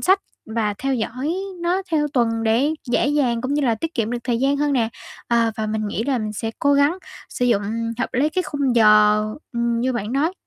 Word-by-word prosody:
sách 380 +2 +3 0.3
và 220 -2 -1
theo 270 0 -1
dõi 255 +7 -2 0.3
nó 360 +3 0
theo 300 -2 +2
tuần 230 -2 +1
để 235 +7 +2 0.2
dễ - - +2
dàng 255 -6 +1
cũng 265 +3 -2
như 295 - +1
là 235 -4 +2
tiết 325 +8 -5
kiệm 225 -1 -1
được 245 - -2
thời 240 -2 0
gian 275 +2 +2
hơn 290 0 +1
nè, 235 -4 +2 0.4
à, 235 -1 +3
và 220 - -2
mình 215 0 -2
nghĩ 225 +2 -2
là 270 -3 0
mình 215 -1 -3
sẽ 225 +1 -3
cố 285 - +3
gắng 285 +6 +3 0.3
sử 245 - -2
dụng 235 -5 +2 0.4
hợp 255 - -3
lý 275 +4 +2
cái 365 +4 -1
khung 275 -6 -1
giờ, 210 -1 +6 0.4
ừm, 235 0 0
như 255 +2 0
bạn 230 0 -3
nói. 305 +6 +1
245 Hz, 230 wpm, -21 LUFS, 225-285 Hz, 0.4 s, giờ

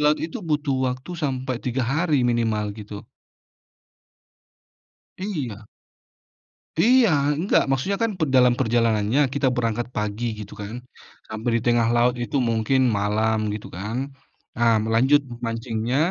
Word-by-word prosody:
laut 150 +1 +4
itu, 160 - -4
butuh 150 -2 0
waktu 130 +7 -6
sampai 130 -2 -2
3 125 +1 -1
hari, 145 0 +1
minimal, 115 -3 +1
gitu. 105 -1 -9 2.1
Iya. 135 - -5 1.1
Iya. 240 +5 +5 0.3
Enggak, 180 +6 +2
maksudnya 160 +10 0
kan 225 - +1
pe 155 - +2
dalam 125 -1 +6
perjalanannya, 115 0 +2
kita 140 -2 +1
berangkat 115 -1 -1
pagi, 105 +2 -2
gitu, 105 - -8
kan. 105 +3 -6 0.5
Sampai 110 +2 -3
di 115 - -3
tengah 120 -1 +3
laut 120 +1 +3
itu, 120 +4 -1
mungkin 115 +4 +1 0.2
malam, 110 +1 0
gitu, 105 - -6
kan. 105 +5 -5 0.6
Ah 115 -1 +4
m - - -3
lanjut 135 +6 +4
m 120 -2 -9
mancingnya, 115 +2 -2
120 Hz, 135 wpm, -23 LUFS, 110-135 Hz, 2.1 s, dalam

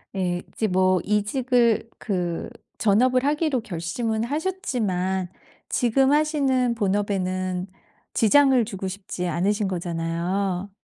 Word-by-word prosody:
예. 180 -2 -1
이제 220 - -2
뭐 185 0 +3
이직을 230 +2 +1
그 180 -5 -3 0.3
전업을 250 +5 +3
하기로 295 -3 +1
결심은 220 +4 -2
하셨지만 220 - -1 0.4
지금 265 +3 +2
하시는 275 -5 +2
본업에는 190 -3 -1 0.5
지장을 260 +1 +4
주고 195 -3 -5
싶지 185 -2 -5
않으신 195 +5 0
거잖아요. 175 +2 -2
205 Hz, 245 characters per minute, -24 LUFS, 185-250 Hz, 0.5 s, 지장을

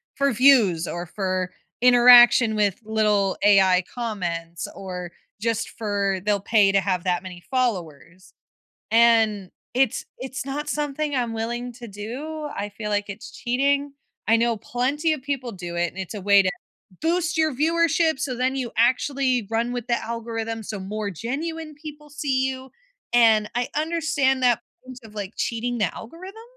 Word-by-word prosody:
for 280 0 +2
views, 220 -10 +4
or 175 0 -4
for 185 0 -2 0.3
interaction 245 -2 +7
with 205 -3 +1
little 210 -3 +1
AI 190 -3 +5
comments, 175 - -4
or 180 -2 -6 0.3
just 225 -1 -1
for 200 -3 -1
they'll 205 -1 +2
pay 200 0 +3
to 195 - +3
have 185 -3 -1
that 180 -2 0
many 180 -2 -10
followers, 185 - -3 0.6
and 225 -4 +3 0.2
it's 265 -3 +1
it's 260 +1 -6
not 290 +2 -4
something 295 0 -2
I'm 240 -3 -1
willing 240 +2 -3
to 240 0 -10
do. 280 +10 -6
I 205 +1 -3
feel 210 +1 -6
like 205 0 -1
it's 200 +3 -8
cheating. 280 +3 0 0.4
I 225 - +5
know 230 -1 +1
plenty 280 +9 -1
of 300 - -5
people 270 -4 -3
do 175 -4 -7
it, 175 0 +1
and 185 - -18
it's 190 - -5
a 205 - -6
way 200 0 +6
to 185 - +2 0.5
boost 335 +1 0
your 315 -1 +2
viewership, 325 +1 +2
so 260 -2 -2
then 255 +2 0
you 255 -3 -3
actually 255 -1 +1
run 230 +2 0
with 245 -1 -5
the 235 - +1
algorithm, 225 -1 -4
so 210 0 -5
more 205 +2 -4
genuine 305 - -5
people 300 0 -11
see 265 -3 0
you, 260 0 -6 0.4
and 220 -3 +5
I 245 0 -1
understand 305 -4 0
that 240 -1 +3 0.2
point 255 -1 -10
of 215 -1 -14
like 205 0 -5
cheating 240 +1 -2
the 210 - +1
algorithm. 370 - -10
235 Hz, 165 wpm, -23 LUFS, 200-270 Hz, 0.6 s, interaction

